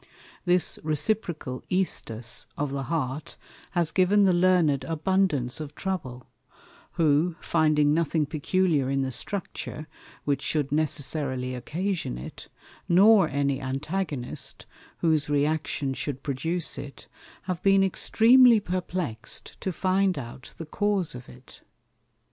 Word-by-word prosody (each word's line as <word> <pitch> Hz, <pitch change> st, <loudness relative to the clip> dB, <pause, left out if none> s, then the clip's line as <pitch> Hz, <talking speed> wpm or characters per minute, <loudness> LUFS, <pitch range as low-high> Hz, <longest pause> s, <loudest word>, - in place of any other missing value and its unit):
This 180 Hz, 0 st, +2 dB
reciprocal 155 Hz, -3 st, -2 dB
Æstus 120 Hz, -11 st, -2 dB
of 145 Hz, -1 st, -2 dB
the 135 Hz, -1 st, -3 dB
Heart 150 Hz, -3 st, -3 dB, 0.4 s
has 170 Hz, -3 st, +1 dB
given 195 Hz, +2 st, +4 dB
the 190 Hz, -2 st, +4 dB
Learned 175 Hz, -6 st, +3 dB
abundance 160 Hz, -4 st, 0 dB
of 150 Hz, -1 st, -8 dB
trouble; 130 Hz, -11 st, -4 dB, 0.7 s
who, 160 Hz, +2 st, +2 dB
finding 150 Hz, -2 st, +2 dB
nothing 160 Hz, -1 st, +1 dB
peculiar 155 Hz, -1 st, +1 dB
in 135 Hz, 0 st, +1 dB
the 130 Hz, -, -2 dB
Structure, 155 Hz, -2 st, -4 dB, 0.4 s
which 140 Hz, -2 st, 0 dB
shou'd 150 Hz, -3 st, -1 dB
necessarily 140 Hz, -3 st, -1 dB
occasion 160 Hz, -, -3 dB
it, 60 Hz, -, -9 dB, 0.4 s
nor 195 Hz, 0 st, +6 dB
any 140 Hz, -1 st, 0 dB
Antagonist, 135 Hz, +1 st, -3 dB, 0.4 s
whose 155 Hz, -3 st, +2 dB
re 145 Hz, 0 st, +2 dB
action 150 Hz, -3 st, -1 dB
should 135 Hz, 0 st, -5 dB
produce 155 Hz, +3 st, -2 dB
it, 140 Hz, 0 st, -9 dB, 0.4 s
have 185 Hz, -2 st, -3 dB
been 195 Hz, 0 st, +4 dB
extreamly 230 Hz, +5 st, +5 dB
perplex'd 180 Hz, -, -4 dB
to 190 Hz, -, -1 dB
find 185 Hz, +1 st, +1 dB
out 125 Hz, 0 st, -9 dB
the 165 Hz, -, -6 dB
cause 200 Hz, +1 st, 0 dB
of 125 Hz, 0 st, -10 dB
it. 125 Hz, +1 st, -15 dB
155 Hz, 120 wpm, -26 LUFS, 135-185 Hz, 0.7 s, nor